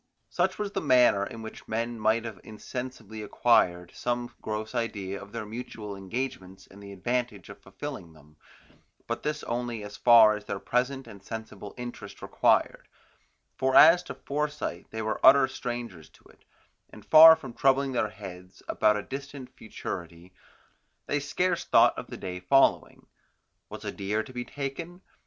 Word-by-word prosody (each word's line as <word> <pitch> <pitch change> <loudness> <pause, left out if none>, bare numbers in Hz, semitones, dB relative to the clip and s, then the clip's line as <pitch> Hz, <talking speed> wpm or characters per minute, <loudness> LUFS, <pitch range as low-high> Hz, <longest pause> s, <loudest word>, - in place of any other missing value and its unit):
Such - - 0
was 210 -1 -3
the - - -2
manner 125 -8 +4
in 115 - -9
which 110 - -10
men 115 +1 -3
might 110 +2 +1
have 110 -5 -7
insensibly 110 -1 -7
acquired 90 -5 +2
some 120 0 -3
gross 110 +1 -4
idea 100 -5 -3
of 100 0 -12
their 115 -1 -5
mutual 110 -2 -7
engagements 95 -2 -6
and 100 +1 -16
the 100 0 -10
advantage 115 0 -3
of - - -11
fulfilling 85 -2 -8
them, 75 0 -20 0.7
but - - -4
this 150 0 -3
only 120 -2 -3
as 105 0 -9
far 115 -3 +7
as 105 0 -9
their - - -4
present 130 +5 -1
and 100 -4 -13
sensible 110 -1 -8
interest 120 -4 -8
required; - - +1 0.7
for 130 0 0
as 165 +3 +8
to - - -9
foresight 150 -10 -4
they 110 0 -5
were 110 0 -3
utter 135 0 +7
strangers 120 - -6
to - - -24
it, - - -23 0.4
and - - -14
far 160 +1 +10
from 135 -7 -10
troubling 135 +1 +2
their 120 -4 0
heads 95 -3 -11
about 105 -1 +2
a 105 - -4
distant 140 -1 -8
futurity, 90 -4 -8 0.7
they 145 - -1
scarce 175 +5 -1
thought - - +4
of - - -7
the - - -8
day 90 -1 -6
following. 135 +10 +2 0.6
Was - - -9
a - - -3
deer 105 +3 -2
to 130 - -13
be 125 -1 -5
taken? 165 +6 -6
115 Hz, 165 wpm, -27 LUFS, 100-130 Hz, 0.7 s, far